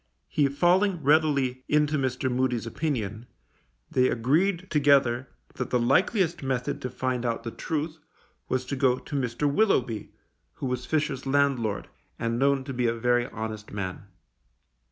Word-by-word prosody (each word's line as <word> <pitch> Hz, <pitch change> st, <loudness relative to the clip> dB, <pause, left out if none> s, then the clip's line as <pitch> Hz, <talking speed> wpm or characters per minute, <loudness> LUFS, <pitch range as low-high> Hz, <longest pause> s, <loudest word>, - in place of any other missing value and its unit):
He 145 Hz, -2 st, +2 dB
falling 175 Hz, +4 st, +2 dB
readily 140 Hz, -4 st, +2 dB
into 150 Hz, 0 st, +3 dB
Mr. 130 Hz, -2 st, -1 dB
Moody's 125 Hz, -2 st, 0 dB
opinion, 115 Hz, -4 st, -3 dB, 0.6 s
they 130 Hz, 0 st, +3 dB
agreed 170 Hz, -, +1 dB
together 135 Hz, -4 st, +3 dB, 0.2 s
that -, -, -4 dB
the 125 Hz, -, +2 dB
likeliest 175 Hz, -, +2 dB
method 130 Hz, -2 st, -2 dB
to 125 Hz, -, -3 dB
find 125 Hz, 0 st, -2 dB
out 115 Hz, -2 st, -1 dB
the 115 Hz, -, -4 dB
truth 155 Hz, +3 st, -3 dB, 0.5 s
was 130 Hz, 0 st, 0 dB
to 140 Hz, -, -3 dB
go 130 Hz, -2 st, +3 dB
to 145 Hz, -, -8 dB
Mr. 130 Hz, +1 st, 0 dB
Willoughby, 135 Hz, -, +1 dB, 0.4 s
who -, -, -6 dB
was 125 Hz, -1 st, -3 dB
Fisher's 145 Hz, -4 st, -1 dB
landlord, 135 Hz, -7 st, +1 dB, 0.3 s
and 115 Hz, +1 st, -1 dB
known 140 Hz, 0 st, +2 dB
to 135 Hz, 0 st, -6 dB
be 125 Hz, -1 st, +1 dB
a 115 Hz, -, +1 dB
very 120 Hz, +1 st, +1 dB
honest 110 Hz, -3 st, -6 dB
man. 100 Hz, -1 st, -5 dB
130 Hz, 150 wpm, -27 LUFS, 120-150 Hz, 0.6 s, into